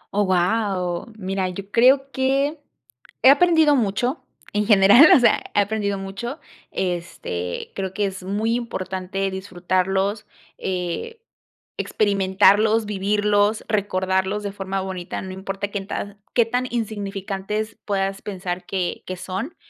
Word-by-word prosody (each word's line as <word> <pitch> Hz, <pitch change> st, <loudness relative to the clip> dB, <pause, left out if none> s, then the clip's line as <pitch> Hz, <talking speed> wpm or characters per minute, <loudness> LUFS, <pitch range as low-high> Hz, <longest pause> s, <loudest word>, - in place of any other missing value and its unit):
¡Oh, 205 Hz, -1 st, +3 dB
guau! 185 Hz, +1 st, 0 dB
Mira, 190 Hz, -1 st, -2 dB
yo 195 Hz, +2 st, -8 dB
creo 270 Hz, +3 st, +4 dB
que 275 Hz, +3 st, 0 dB, 0.6 s
he 260 Hz, -, +9 dB
aprendido 320 Hz, -2 st, +5 dB
mucho 245 Hz, +5 st, 0 dB, 0.3 s
en 210 Hz, 0 st, 0 dB
general, 210 Hz, +7 st, +8 dB
o -, -, +6 dB
sea, 235 Hz, -3 st, +5 dB, 0.2 s
he -, -, +4 dB
aprendido 205 Hz, -1 st, 0 dB
mucho, 195 Hz, +9 st, -6 dB, 0.3 s
este, 170 Hz, -, -4 dB
creo 190 Hz, -1 st, -4 dB
que 205 Hz, -, +1 dB
es 190 Hz, -1 st, -4 dB
muy 210 Hz, +4 st, -1 dB
importante 195 Hz, -4 st, -3 dB
disfrutarlos, 190 Hz, +2 st, -1 dB, 0.3 s
eh, 185 Hz, -, -3 dB, 0.6 s
experimentarlos, 205 Hz, +2 st, +3 dB
vivirlos, 205 Hz, +1 st, +1 dB
recordarlos 190 Hz, -1 st, 0 dB
de 200 Hz, -, -3 dB
forma 195 Hz, -1 st, -3 dB
bonita, 185 Hz, -2 st, -5 dB
no 190 Hz, -, -7 dB
importa 195 Hz, +1 st, -4 dB
qué 200 Hz, -, -3 dB
en 195 Hz, -, -9 dB
ta 205 Hz, 0 st, -5 dB, 0.2 s
qué 235 Hz, -, +5 dB
tan 250 Hz, +2 st, -1 dB
insignificantes 210 Hz, -1 st, -3 dB
puedas 195 Hz, -1 st, -1 dB
pensar 185 Hz, -3 st, -5 dB
que 185 Hz, -2 st, -2 dB
que 185 Hz, -, -4 dB
son. 195 Hz, -, -5 dB
200 Hz, 130 wpm, -22 LUFS, 190-220 Hz, 0.6 s, he